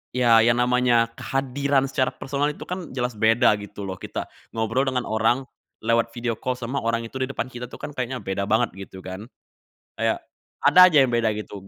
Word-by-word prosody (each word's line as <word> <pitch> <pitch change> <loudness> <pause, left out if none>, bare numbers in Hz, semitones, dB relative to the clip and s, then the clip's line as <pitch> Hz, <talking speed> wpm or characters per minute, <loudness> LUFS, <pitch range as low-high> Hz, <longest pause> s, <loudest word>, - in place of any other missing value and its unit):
ya, 120 -3 +5
yang 120 0 +4
namanya 125 -2 +3
kehadiran 135 +2 0
secara 130 -1 +1
personal 140 +1 -2
itu - - -9
kan 180 -1 -5
jelas 125 -1 -2
beda, 110 +2 +4
gitu 105 0 -8
loh, 95 -1 -5
kita - - -5 0.3
ngobrol 115 +4 0
dengan 125 -2 -2
orang 115 +4 +1 0.4
lewat 115 0 +2
video 120 -1 -1
call 130 0 -2
sama 125 +3 -3
orang 115 0 -1
itu 130 +3 -7
di 130 - 0
depan 135 - -3
kita 125 0 -7
tuh - - -10
kan - - -5
kayaknya 130 -1 -3
beda 95 +1 -2
banget, 110 -2 +2
gitu, 95 -1 -10
kan. 95 +4 -7 0.7
Kayak, - - 0 0.4
ada - - +6
aja 160 - +3
yang 125 - 0
beda, 115 -2 +1
gitu, 100 -2 -8
120 Hz, 195 wpm, -24 LUFS, 110-130 Hz, 0.7 s, ada